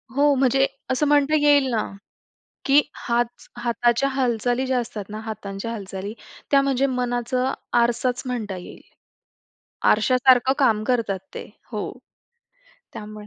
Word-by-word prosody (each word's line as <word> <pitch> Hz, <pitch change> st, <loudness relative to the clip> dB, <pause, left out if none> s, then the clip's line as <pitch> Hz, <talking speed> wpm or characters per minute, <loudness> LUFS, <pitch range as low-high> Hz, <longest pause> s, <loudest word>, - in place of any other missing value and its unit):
हो, 290 Hz, +1 st, +4 dB
म्हणजे 270 Hz, +1 st, +3 dB, 0.2 s
असं 260 Hz, +3 st, +1 dB
म्हणता 290 Hz, +1 st, +3 dB
येईल 290 Hz, -1 st, +5 dB
ना, 225 Hz, -2 st, +1 dB, 0.8 s
की 280 Hz, +2 st, +6 dB
हात 240 Hz, 0 st, 0 dB, 0.3 s
हाताच्या 240 Hz, +2 st, +1 dB
हालचाली 245 Hz, -1 st, 0 dB
ज्या 260 Hz, -1 st, +1 dB
असतात 220 Hz, -3 st, -5 dB
ना, 215 Hz, +1 st, -6 dB
हातांच्या 215 Hz, -1 st, -6 dB
हालचाली, 200 Hz, -2 st, -6 dB, 0.4 s
त्या 275 Hz, -1 st, +6 dB
म्हणजे 275 Hz, -1 st, +1 dB
मनाचा 250 Hz, 0 st, -1 dB, 0.3 s
आरसाचं 245 Hz, +2 st, 0 dB
म्हणता 215 Hz, -6 st, -3 dB
येईल. 180 Hz, -, -11 dB, 1.1 s
आरशासारखं 255 Hz, +3 st, +4 dB
काम 225 Hz, -6 st, +3 dB
करतात 220 Hz, -5 st, 0 dB
ते. -, -, -6 dB, 0.3 s
हो. 210 Hz, -3 st, -3 dB, 1.0 s
त्यामुळे 210 Hz, 0 st, -9 dB
245 Hz, 120 wpm, -23 LUFS, 220-265 Hz, 1.1 s, की